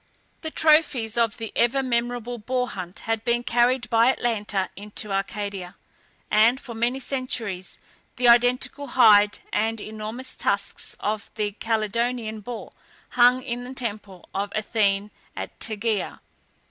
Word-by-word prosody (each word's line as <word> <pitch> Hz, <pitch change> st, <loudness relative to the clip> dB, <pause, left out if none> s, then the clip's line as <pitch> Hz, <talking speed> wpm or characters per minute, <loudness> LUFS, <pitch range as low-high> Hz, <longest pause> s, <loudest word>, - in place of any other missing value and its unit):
The 315 Hz, -, -4 dB
trophies 300 Hz, -9 st, +3 dB
of 230 Hz, -3 st, +1 dB
the 225 Hz, -2 st, -6 dB
ever 240 Hz, +3 st, +2 dB
memorable 240 Hz, -1 st, -2 dB
boar 250 Hz, +3 st, -1 dB
hunt 185 Hz, -2 st, -7 dB
had 225 Hz, -1 st, -2 dB
been 240 Hz, 0 st, +1 dB
carried 245 Hz, +1 st, +2 dB
by 230 Hz, +1 st, +5 dB
Atalanta 210 Hz, -6 st, 0 dB
into 210 Hz, +1 st, -5 dB
Arcadia, 195 Hz, -2 st, -3 dB, 0.6 s
and, 230 Hz, +4 st, +5 dB
for 240 Hz, -, -9 dB
many 240 Hz, +3 st, 0 dB
centuries, 235 Hz, -9 st, -4 dB, 0.4 s
the 245 Hz, 0 st, +2 dB
identical 250 Hz, +4 st, +3 dB
hide 210 Hz, -5 st, +6 dB, 0.2 s
and 225 Hz, +1 st, 0 dB
enormous 220 Hz, +4 st, -6 dB
tusks -, -, -2 dB
of 210 Hz, 0 st, -2 dB
the 210 Hz, -1 st, -1 dB
Calydonian 225 Hz, +1 st, -1 dB
boar 230 Hz, +2 st, -7 dB, 0.4 s
hung 250 Hz, +1 st, +4 dB
in 245 Hz, -1 st, -4 dB
the 255 Hz, +1 st, -8 dB
temple 210 Hz, -7 st, -4 dB
of 200 Hz, +1 st, -2 dB
Athene 205 Hz, -1 st, +1 dB, 0.2 s
at -, -, -7 dB
Tegea. 220 Hz, -1 st, 0 dB
230 Hz, 135 wpm, -24 LUFS, 210-245 Hz, 0.6 s, hide